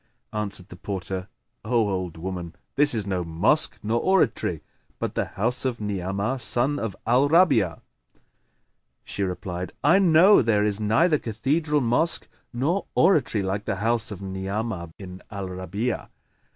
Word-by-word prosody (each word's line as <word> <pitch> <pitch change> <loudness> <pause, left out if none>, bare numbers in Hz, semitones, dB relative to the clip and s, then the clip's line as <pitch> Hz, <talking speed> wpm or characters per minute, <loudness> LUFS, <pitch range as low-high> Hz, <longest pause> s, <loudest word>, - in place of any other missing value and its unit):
Answered 100 -4 -4
the 90 - -11
porter, 95 -1 -5 0.4
"O 115 -1 +1
old 90 -4 -3
woman, 90 -1 -6 0.2
this 145 -2 +3
is 105 -3 -2
no 95 -3 -1
mosque 80 0 +2
nor 110 +3 +1
oratory, 190 -2 +1 0.3
but - - -3
the - - -1
house 120 +5 +2
of 130 -3 -2
Ni'amah 100 +4 -2
son 130 +4 +2
of 110 -4 -4
al 125 +5 +3
Rabi'a." 150 - +3 1.2
She - - -6
replied, 90 -1 -4
"I 170 +7 +5
know 185 +2 +6
there 110 -3 +2
is 105 -1 +1
neither 120 +10 +3
cathedral 145 +7 0
mosque 125 +8 +1 0.2
nor 145 +11 -1
oratory 135 - +3
like 100 +2 -2
the - - -1
house 115 +3 +1
of 100 -2 -7
Ni'amah 95 0 -4
bin 95 -2 -10
al 100 -3 -5
Rabi'a. 95 +6 -3
105 Hz, 145 wpm, -25 LUFS, 95-130 Hz, 1.2 s, know